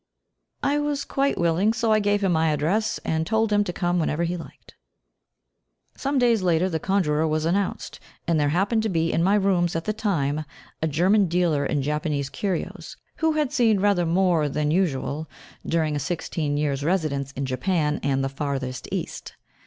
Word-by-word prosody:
I 285 +1 +2
was 290 -1 -2
quite 275 +1 0
willing, 170 +6 +2
so 230 -1 0
I 215 - +4
gave 205 0 +1
him 190 - +2
my 160 -1 +2
address 170 +9 0
and 160 0 -1
told 220 0 +1
him 205 0 +4
to 180 - -2
come 175 0 0
whenever 160 0 0
he 170 +1 -1
liked. 170 - -11 1.2
Some 275 +1 -1
days 240 -4 +3
later 175 0 +2
the 160 -3 -2
conjurer 160 -5 +1
was 155 0 0
announced, 190 +3 -1 0.3
and 165 -2 +2
there 145 -1 +2
happened 200 +8 +1
to 220 - -1
be 165 -3 0
in - - +2
my 195 +4 +3
rooms 185 -4 +2
at 165 - -2
the 215 - 0
time 155 -9 -1 0.4
a 160 - +1
German 185 +7 +3
dealer 170 -4 +1
in 145 -2 -1
Japanese 150 -1 -2
curios, 190 -5 -4 0.2
who 320 -1 +2
had 300 -3 0
seen 225 -7 +3
rather 190 -4 +2
more 170 -3 +2
than 150 +1 -1
usual 155 -3 -1 0.4
during 160 -2 0
a - - -1
sixteen 150 -1 -2
years' 145 -2 -1
residence 150 -5 -1
in 135 +1 -3
Japan 150 +3 0
and 135 -1 0
the - - +1
Farthest 135 -2 -4
East. - - -5
170 Hz, 185 wpm, -24 LUFS, 150-200 Hz, 1.2 s, I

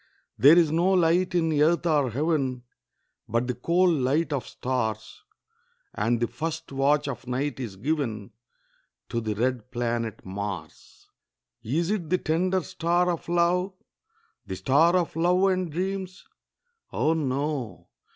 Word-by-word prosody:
There 150 +5 +7
is 165 -3 +4
no 175 +4 +2
light 180 0 +2
in 165 -2 +2
earth 170 +3 +3
or 150 -6 +2
heaven, 135 -1 -1 0.7
But 115 +3 +1
the 125 - -1
cold 170 +6 +2
light 145 +5 +1
of 135 - -3
stars; 110 - -3 0.7
And 115 +2 0
the 120 - +2
first 160 +6 -5
watch 145 +2 +2
of 125 -3 -6
night 130 +1 -2
is 115 -7 -5
given 115 -3 -2 0.8
To 115 - -2
the 110 -2 -2
red 125 +1 -1
planet 120 -3 -3
Mars. 100 +1 -7 0.5
Is 165 - -1
it 180 -7 -2
the 185 - +3
tender 180 +3 0
star 175 +4 +1
of 170 0 -5
love? 175 +2 +1 0.7
The - - -4
star 160 +6 +3
of 175 -4 0
love 175 +3 +2
and 185 -3 -1
dreams? 185 +2 -4 0.7
Oh, 155 - +1
no! 140 -4 -3
150 Hz, 140 wpm, -26 LUFS, 125-170 Hz, 0.8 s, There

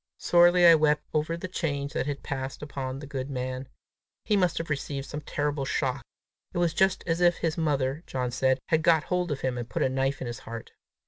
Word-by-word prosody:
Sorely 175 0 +5
I 170 - +10
wept 150 -1 +3
over 155 +2 0
the 175 - -5
change 145 -5 -2
that 135 - -1
had 145 -1 -4
passed 135 +1 -4
upon 135 -3 -4
the 145 - -8
good 135 -1 -5
man. 130 0 -4 0.6
He 210 - +2
must 180 -4 +2
have 165 -1 -3
received 140 -1 -3
some 150 +1 -6
terrible 145 -1 -2
shock! 135 0 -1 0.5
It - - -1
was 175 -2 +2
just 190 +2 +2
as 170 0 0
if 175 0 +5
his 165 -2 -1
mother, 145 -2 0
John 125 -2 -2
said, 130 +1 +2
had 160 -1 +3
got 160 -1 +4
hold 180 -2 -1
of 140 - -3
him, 125 -2 -1
and 120 - -6
put - - 0
a - - +2
knife 135 +1 0
in - - -4
his 120 -1 -5
heart! 115 0 -8
145 Hz, 220 wpm, -27 LUFS, 130-165 Hz, 0.6 s, I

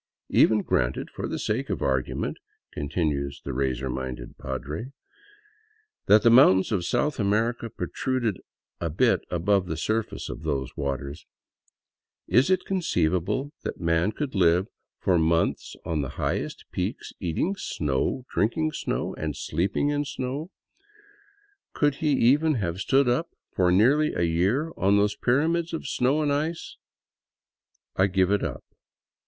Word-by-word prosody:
Even 105 -2 +4
granted, - - 0
for - - -4
the - - -3
sake 125 +6 -2
of - - -2
argument," 65 -2 -1 0.4
con 70 -1 -4
tinues 70 -5 -1
the - - -4
razor 65 0 -1
minded 65 -2 -5
padre, 75 - -5 0.5
" 430 0 -37
that 105 +1 +6
the 115 - +6
mountains 115 -7 +6
of 95 -5 0
South 150 - 0
America 115 +3 0
protruded 115 +3 -2 0.4
a 85 - -2
bit 75 - +2
above 90 +2 +1
the 80 - -3
surface 110 +6 -2
of - - -7
those 70 -5 -3
waters, 70 +2 -4 1.0
is 125 - +3
it 185 -1 +2
conceivable 130 - 0
that - - -5
man 85 +3 +1
could 145 +3 -4
live 90 -1 +3 0.3
for 90 -3 +2
months 80 +1 +1
on 80 -3 -1
the 70 - -3
highest - - -2
peaks, - - -4
eating 125 - -1
snow, 75 - -2
drinking 155 +9 0
snow, - - -3
and - - -3
sleeping 100 +11 0
in 145 0 0
snow? 140 +3 -4 1.2
Could 145 -2 +1
he 150 -2 +2
even 145 +5 +4
have 90 -6 -2
stood 135 +5 +3
up 125 +8 +1 0.2
for 90 -1 +2
nearly 135 +11 +4
a 85 - +1
year 95 - +1
on 100 +2 +3
those 105 0 +2
pyramids 160 +9 +1
of 160 - -4
snow 135 +5 +1
and 145 -1 +1
ice? 155 +4 -3 0.6
" - - -51
I 95 - +4
give 95 0 +2
it 105 - +2
up. - - -4
105 Hz, 150 wpm, -26 LUFS, -, 1.2 s, that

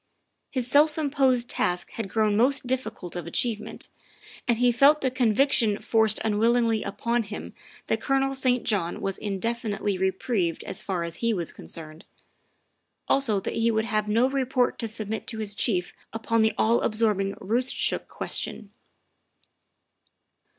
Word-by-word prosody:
His 255 -3 -1
self 295 +5 +4
imposed 270 -5 +2
task 175 -6 -1
had 220 -4 -5
grown 215 0 +1
most 255 +4 +3
difficult 225 -8 -4
of 175 -2 -5
achievement, 220 +5 -3 0.6
and 235 -2 +2
he 245 +1 +4
felt 280 +5 +5
the 260 - 0
conviction 245 -3 +2
forced 220 -1 +2
unwillingly 225 +1 +2
upon 235 +1 -1
him 210 -1 -7 0.3
that - - -1
Colonel 270 0 +1
St. 255 -2 +1
John 195 -6 0
was 195 -1 -3
indefinitely 205 -1 -2
reprieved 190 -2 -1
as - - -3
far 185 -3 -2
as 170 0 -5
he 230 -1 0
was 170 -4 -3
concerned; 155 0 -10 1.0
also 230 -7 +2
that - - -4
he 230 0 +2
would 220 -1 +1
have 215 -2 -1
no 230 +4 +3
report 265 -2 0
to 230 - -2
submit 220 0 -3
to 225 - -4
his 215 -2 -3
chief 190 -4 0 0.2
upon 225 0 0
the 220 0 +2
all 230 +2 +3
absorbing 210 -3 0
Roostchook 240 +6 0
question. 205 -2 -3
225 Hz, 145 wpm, -26 LUFS, 205-250 Hz, 1.0 s, felt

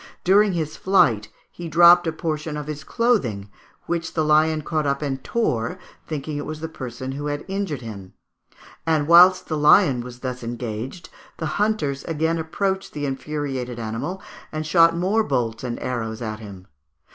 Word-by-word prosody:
During 200 +2 +4
his 155 -3 -3
flight 125 - +3 0.2
he 175 - -7
dropped 175 +1 +7
a - - +1
portion 155 -1 -3
of 150 - -5
his 150 0 -6
clothing, 130 - 0 0.3
which 170 -1 -3
the 155 -2 +1
lion 155 0 +3
caught 155 -1 -1
up 140 +1 -1
and 135 -2 -3
tore, 125 - -1 0.3
thinking 150 -1 -4
it 145 - -4
was 155 0 -5
the 160 - -4
person 130 -4 -6
who 145 +2 -4
had 145 0 -3
injured 195 -8 -3
him; 100 -5 -9 0.7
and 155 -3 +1
whilst 180 +2 +7
the 155 -2 -2
lion 150 -4 +5
was 125 0 -10
thus 125 -1 -4
engaged 120 +7 -5 0.3
the 160 - -3 0.2
hunters 150 -11 0
again 160 +1 0
approached 190 +4 -2
the 145 -1 -3
infuriated 135 -3 -4
animal 115 +12 -4 0.3
and 155 0 -4
shot 165 +1 +4
more 200 +6 +2
bolts 120 - -1
and 120 -2 -4
arrows 115 -3 -3
at 110 -1 -4
him. 100 -4 -10
150 Hz, 170 wpm, -23 LUFS, 125-170 Hz, 0.7 s, dropped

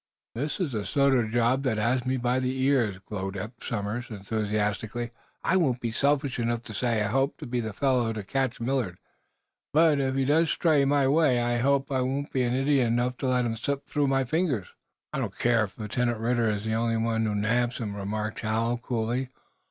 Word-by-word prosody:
"This 145 - -3
is 175 -7 -1
the 110 -4 -2
sort 140 +7 +2
of 120 -4 +2
job 120 +3 +2
that 130 -5 0
has 120 +3 +1
me 130 0 +1
by 125 +1 +1
the 130 +1 -2
ears," 125 -8 +2
glowed 95 -1 -4
Eph 110 +4 -5
Somers, 115 +2 -3
enthusiastically. 105 +2 -2 0.3
"I 185 - +3
won't 135 -9 +2
be 115 -2 -2
selfish 140 +1 +1
enough 120 0 -1
to 110 - -8
say 115 0 0
I - - 0
hope 135 +5 +1
to - - -8
be 125 0 -2
the 110 -2 -3
fellow 125 -1 +1
to 110 -2 -4
catch 130 +4 -1
Millard. 115 -7 -1 0.8
But, 155 -1 +5
if 135 -1 0
he 135 -1 +1
does 160 +3 +3
stray 150 -5 +3
my 140 -1 +3
way, 140 -3 +4
I 120 0 +1
hope 140 +2 +1
I 130 -1 +1
won't 135 +3 -2
be 130 - +1
idiot 130 +1 +2
enough 120 +2 0
to 135 - -2
let 125 -1 +2
him 115 -1 -1
slip 140 +4 -3
through 145 -2 0
my 135 0 +2
fingers." 135 - -1 0.4
"I - - -1
don't - - -4
care 115 -2 +3
if 95 - -14
Lieutenant 120 +2 -1
Ridder 115 0 +1
is 105 0 -2
the 110 0 0
one 115 0 +1
who 105 - -1
nabs 120 +4 +1
him," 105 -4 -4
remarked 105 +2 -3
Hal, 115 +2 0
coolly. 120 +1 -2
120 Hz, 205 wpm, -27 LUFS, 110-135 Hz, 0.8 s, But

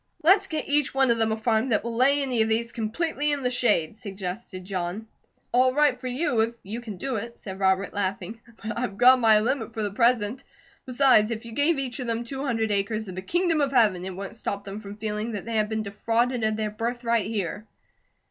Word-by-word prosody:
"Let's 385 +4 +5
get 315 -3 -3
each 290 -2 +1
one 270 -2 +4
of 230 - +1
them 225 -1 +2
a 220 - -1
farm 225 +2 +1
that 215 - +1
will 235 0 -4
lay 275 +4 +4
any 250 -4 0
of 220 - +2
these 230 +1 0
completely 295 +7 -1
in 285 -2 -1
the 250 - +1
shade," 210 -9 +1
suggested 195 -3 -7
John. 185 +2 -4 0.5
"All 255 +1 +3
right 295 -3 +4
for 255 +1 -7
you, 250 -1 0
if 230 +1 +1
you 220 +5 -6
can 215 -5 -7
do 260 +3 -3
it," 235 +3 -6
said 190 -1 -8
Robert, 190 0 +1
laughing, 200 +2 -3 0.2
"but 220 +1 -3
I've 205 -6 -3
gone 255 +2 +7
my 220 -3 +5
limit 245 0 -2
for 220 - -2
the 205 - -2
present. 230 +1 +1 0.4
Besides, 255 -4 +4
if 230 0 -4
you 230 - -8
gave 290 +6 +2
each 260 -1 -3
of 250 - -4
them 230 0 -1
two 270 +3 -4
hundred 225 -5 0
acres 210 +2 -1
of 185 - -6
the 185 - -5
Kingdom 335 - +1
of 280 -1 +1
Heaven, 215 -9 +3
it 190 -1 -5
wouldn't 195 +2 -7
stop 200 -3 -4
them 200 +1 -7
from 205 -1 -9
feeling 215 +1 -3
that 205 -3 -5
they 230 -1 -2
had 210 0 +1
been 220 -1 -2
defrauded 230 +4 0
of 215 0 +1
their 215 -1 -2
birthright 230 -1 -1
here." 210 0 -3
225 Hz, 230 wpm, -25 LUFS, 210-255 Hz, 0.5 s, gone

